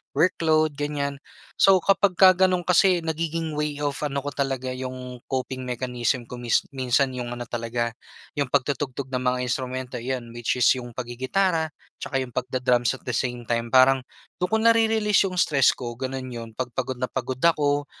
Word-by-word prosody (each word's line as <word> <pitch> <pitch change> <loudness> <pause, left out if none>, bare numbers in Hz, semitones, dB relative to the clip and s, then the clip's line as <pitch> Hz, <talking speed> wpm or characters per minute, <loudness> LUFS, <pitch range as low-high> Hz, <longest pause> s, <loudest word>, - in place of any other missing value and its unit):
workload, 155 -3 +3
ganyan. 140 -1 -2 0.4
So, 195 -1 +7
kapagka 190 -1 +5 0.2
gano'n 180 -1 0
kasi 180 -1 +4
nagiging 160 0 -2
way 150 -1 -2
of 145 -1 -1
ano 140 -1 -3
ko 145 - -3
talaga, 135 -2 -2
yung 130 -1 -6
coping 130 -1 -3
mechanism 125 0 -1
ko 120 +1 -9
mis 120 -2 +2
minsan 130 0 +1
yung 120 -1 -5
ano 120 - -5
talaga, 120 0 -2 0.5
yung 140 - +1
pagtutugtog 140 0 -1
ng 125 - 0
mga 125 0 +1
instrumento. 130 0 -3
'Yan, 120 -1 -4
which 120 -1 -2
is 125 -1 +2
yung 120 -2 -9
paggigitara 145 +8 0 0.3
'tsaka 135 -2 -2
yung 125 - -9
pagda-drums 125 0 +1
at - - -15
the 125 - -3
same 120 +1 -2
time. 115 0 -1
Parang 130 +1 +6 0.4
dun 180 - +1
ko - - +5
nare-release 225 -3 +4
yung 190 - -3
stress 140 -7 +4
ko, 120 -2 -6
ganun 130 0 -4
yun. 115 -1 -6
'Pag 130 -1 -2
pagod 130 - -1
na 125 0 -2
pagod 130 0 -4
ako 145 -3 +2
130 Hz, 175 wpm, -24 LUFS, 125-150 Hz, 0.5 s, So